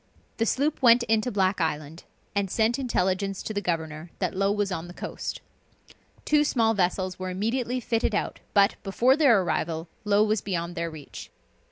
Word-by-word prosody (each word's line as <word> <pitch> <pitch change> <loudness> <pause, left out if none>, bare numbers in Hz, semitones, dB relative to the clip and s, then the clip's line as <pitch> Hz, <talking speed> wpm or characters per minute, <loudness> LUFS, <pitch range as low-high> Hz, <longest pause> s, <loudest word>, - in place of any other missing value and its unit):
The 225 - +1
sloop 285 +6 0
went 240 -1 +6
into 225 +1 +1
Black 190 -2 +1
Island, 155 0 -3 0.3
and 200 -1 0
sent 225 +6 +1
intelligence 195 -5 -1
to 215 - -4
the 205 - -1
governor 160 -2 -3
that - - -1
Low 195 +1 +1
was 205 -1 0
on 170 -1 -4
the 175 - -11
coast. - - -5 0.8
Two 300 -1 +4
small 230 -6 +2
vessels 185 -1 -1
were 185 0 -3
immediately 235 +6 -1
fitted 230 -2 0
out, - - -2 0.2
but, 200 0 +4
before 235 +7 +3
their 275 -9 +5
arrival, 165 -1 -2 0.2
Low 210 0 +3
was 215 -1 +1
beyond 175 -3 -3
their 170 0 -3
reach. 155 -3 -10
200 Hz, 175 wpm, -26 LUFS, 180-230 Hz, 0.8 s, went